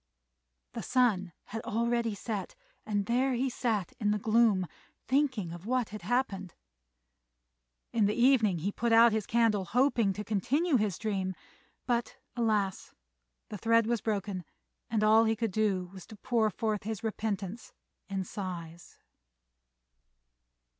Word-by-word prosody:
The -, -, -4 dB
sun 215 Hz, -8 st, +2 dB
had 225 Hz, +1 st, -6 dB
already 235 Hz, -1 st, 0 dB
set, 205 Hz, -1 st, -5 dB, 0.3 s
and 205 Hz, -2 st, 0 dB
there 255 Hz, +4 st, +1 dB
he 260 Hz, +2 st, 0 dB
sat 220 Hz, -8 st, -1 dB
in 210 Hz, -, +1 dB
the 210 Hz, -, +2 dB
gloom 215 Hz, -3 st, +3 dB, 0.4 s
thinking 255 Hz, -, +1 dB
of 175 Hz, +4 st, -9 dB
what 250 Hz, -2 st, 0 dB
had 210 Hz, -1 st, -8 dB
happened. 195 Hz, -4 st, -1 dB, 1.4 s
In 220 Hz, -3 st, +3 dB
the 210 Hz, -, 0 dB
evening 235 Hz, -7 st, +4 dB
he 185 Hz, +6 st, -2 dB
put 235 Hz, +3 st, -1 dB
out 230 Hz, +1 st, +7 dB
his 220 Hz, -2 st, -1 dB
candle, 225 Hz, -4 st, +2 dB
hoping 240 Hz, 0 st, +2 dB
to 210 Hz, +2 st, -5 dB
continue 260 Hz, -, +1 dB
his 210 Hz, -6 st, -1 dB
dream; 190 Hz, -3 st, -2 dB, 0.5 s
but, 240 Hz, 0 st, -1 dB, 0.2 s
alas! 215 Hz, -5 st, -1 dB, 0.5 s
the 210 Hz, -, -6 dB
thread 230 Hz, +1 st, +3 dB
was 235 Hz, -1 st, 0 dB
broken, 200 Hz, -4 st, -2 dB, 0.5 s
and 215 Hz, -2 st, +1 dB
all 220 Hz, +1 st, +6 dB
he 225 Hz, 0 st, +2 dB
could 225 Hz, -1 st, -2 dB
do 190 Hz, -3 st, 0 dB
was 190 Hz, -2 st, -11 dB
to 220 Hz, -, -11 dB
pour 220 Hz, +1 st, +1 dB
forth 215 Hz, -1 st, -2 dB
his 220 Hz, +1 st, -5 dB
repentance 215 Hz, -1 st, -3 dB, 0.4 s
in 195 Hz, -1 st, -2 dB
sighs. 175 Hz, -3 st, -7 dB
215 Hz, 140 wpm, -30 LUFS, 195-235 Hz, 1.4 s, out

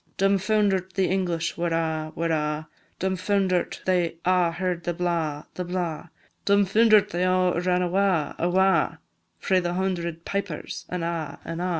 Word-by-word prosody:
Dumfounder'd 195 Hz, -1 st, +2 dB
the 190 Hz, -2 st, +2 dB
English 175 Hz, -3 st, -1 dB
were 175 Hz, -, +1 dB
a', 160 Hz, -1 st, -1 dB
were 165 Hz, 0 st, -1 dB
a', 150 Hz, 0 st, -1 dB, 0.3 s
Dumfounder'd 190 Hz, -1 st, 0 dB
they 175 Hz, -3 st, +1 dB
a' 180 Hz, -1 st, +3 dB
heard 175 Hz, 0 st, -2 dB
the 175 Hz, 0 st, -2 dB
blaw, 165 Hz, -4 st, -1 dB
the 180 Hz, -, -4 dB
blaw, 175 Hz, -2 st, -3 dB, 0.3 s
Dumfounder'd 205 Hz, +2 st, +4 dB
they 175 Hz, -, -2 dB
a' 185 Hz, -1 st, +2 dB
ran 180 Hz, 0 st, +1 dB
awa', 180 Hz, -4 st, +1 dB
awa', 190 Hz, +2 st, +2 dB, 0.4 s
Frae 190 Hz, -1 st, +2 dB
the 175 Hz, -1 st, -2 dB
hundred 170 Hz, -3 st, -2 dB
pipers, 200 Hz, -6 st, -4 dB
an' 180 Hz, -2 st, -3 dB
a', 165 Hz, -2 st, -3 dB
an' 165 Hz, 0 st, -5 dB
a'. 180 Hz, +1 st, -1 dB
180 Hz, 145 wpm, -25 LUFS, 170-190 Hz, 0.4 s, Dumfounder'd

